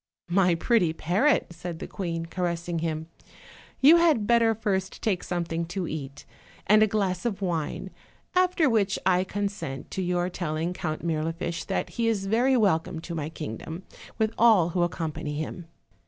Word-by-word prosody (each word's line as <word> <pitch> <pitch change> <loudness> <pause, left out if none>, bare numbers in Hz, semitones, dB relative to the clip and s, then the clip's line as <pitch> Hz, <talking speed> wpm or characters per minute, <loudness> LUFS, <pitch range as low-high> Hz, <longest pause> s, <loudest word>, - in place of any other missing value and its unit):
"My 180 -1 +3
pretty 175 -2 +2
parrot," 200 - +2
said 170 0 -6
the - - -6
queen, 165 -4 -4
caressing 170 -1 -2
him, 160 -1 -2 0.8
"you 305 +6 +8
had 315 -11 +3
better 230 0 +4
first 190 -3 -2
take 195 -5 0
something 170 -1 -2
to 175 +1 -4
eat, 145 -2 -6 0.4
and 215 +1 +5
a 215 - +6
glass 195 -4 -1
of 215 -5 -2
wine, 170 -6 -2 0.4
after 365 -3 +3
which 210 -5 +2
I 185 -1 +4
consent 200 -9 -4
to 190 - -2
your 180 -1 0
telling 170 -1 -2
Count 155 -3 -4
Mir 160 -2 0
lifiche 165 +1 -3
that - - -1
he 230 - +2
is 210 -4 0
very 245 +6 +3
welcome 180 -5 +1
to 170 - -7
my 155 -2 -3
kingdom, 160 - -6 0.3
with 220 -1 +1
all 215 -7 +6
who 175 +1 -1
accompany 160 -3 -2
him. 160 +3 -5
180 Hz, 165 wpm, -27 LUFS, 165-210 Hz, 0.8 s, you